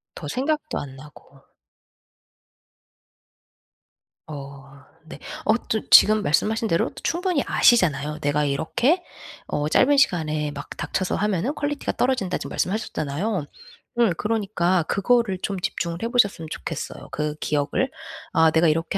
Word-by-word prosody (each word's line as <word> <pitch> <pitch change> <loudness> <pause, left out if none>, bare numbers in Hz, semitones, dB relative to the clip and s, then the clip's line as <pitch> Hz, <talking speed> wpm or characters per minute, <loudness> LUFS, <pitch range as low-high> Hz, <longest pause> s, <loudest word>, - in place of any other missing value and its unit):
더 150 - -7
생각도 300 - -2
안 135 -2 -8
나고. 140 0 -16 2.9
어 140 -2 -10 0.2
네. 160 - -10 0.3
어 220 - +4 0.2
또 220 - -1
지금 215 0 +7
말씀하신 220 +8 +1
대로 165 -5 +1
또 - - -23
충분히 350 -4 0
아시잖아요. 150 - +3
"내가 145 +1 +1
이렇게 240 - +1 0.4
어 150 0 -1
짧은 280 - +4
시간에 155 - +1
막 145 0 -8
닥쳐서 185 -1 -2
하면은 210 - 0
퀄리티가 290 0 -2
떨어진다." 245 -8 0
지금 - - -7
말씀하셨잖아요. 180 -2 -2 0.5
음 225 -6 +4
그러니까 195 -5 0
그거를 200 +2 +1
좀 195 -2 -2
집중을 170 -1 -3
해 - - 0
보셨으면 200 -9 +1
좋겠어요 160 0 -6
그 150 +2 -2
기억을. 145 -1 0 0.4
'아 160 0 +5
내가 160 +2 +3
이렇게 165 +5 0
180 Hz, 295 characters per minute, -23 LUFS, 150-225 Hz, 2.9 s, 지금